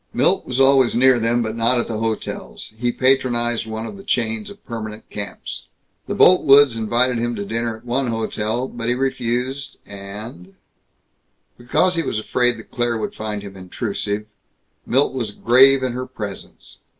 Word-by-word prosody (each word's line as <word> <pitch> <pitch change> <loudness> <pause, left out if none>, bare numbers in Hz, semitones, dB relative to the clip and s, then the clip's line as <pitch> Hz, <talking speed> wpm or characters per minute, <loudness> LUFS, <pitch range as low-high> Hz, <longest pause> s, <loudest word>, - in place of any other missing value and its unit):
Milt - - +2
was 130 0 -2
always 135 -2 +5
near 130 0 +5
them, 115 +1 +1
but 110 0 -4
not 115 +2 +3
at - - -1
the 110 -2 -3
hotels. 110 -1 -4
He 120 +2 -1
patronized 120 -3 +1
one 110 0 -5
of 200 - -8
the 195 - -11
chains 110 - -1
of 205 0 -13
permanent 110 -2 -7
camps. 100 -1 -6 0.4
The - - -3
Boltwoods 145 -7 +6
invited 120 +2 +2
him 120 0 -1
to 100 -1 -4
dinner 115 +1 -2
at 115 - -21
one 125 +2 0
hotel, 115 +1 -2
but 120 -2 -4
he 125 - +2
refused 130 +1 -2
and 100 -1 -8 1.0
Because 170 +9 +1
he - - +2
was 135 - -2
afraid 120 +2 +1
that 110 - -13
Claire 120 -2 0
would 110 - -4
find 105 -1 -5
him 100 -1 -9
intrusive, 100 +2 -3 0.6
Milt 135 +3 +2
was 120 -5 -2
grave 130 +4 +5
in 130 - 0
her 130 +1 -5
presence. 100 -3 -8
120 Hz, 170 wpm, -21 LUFS, 110-130 Hz, 1.0 s, Boltwoods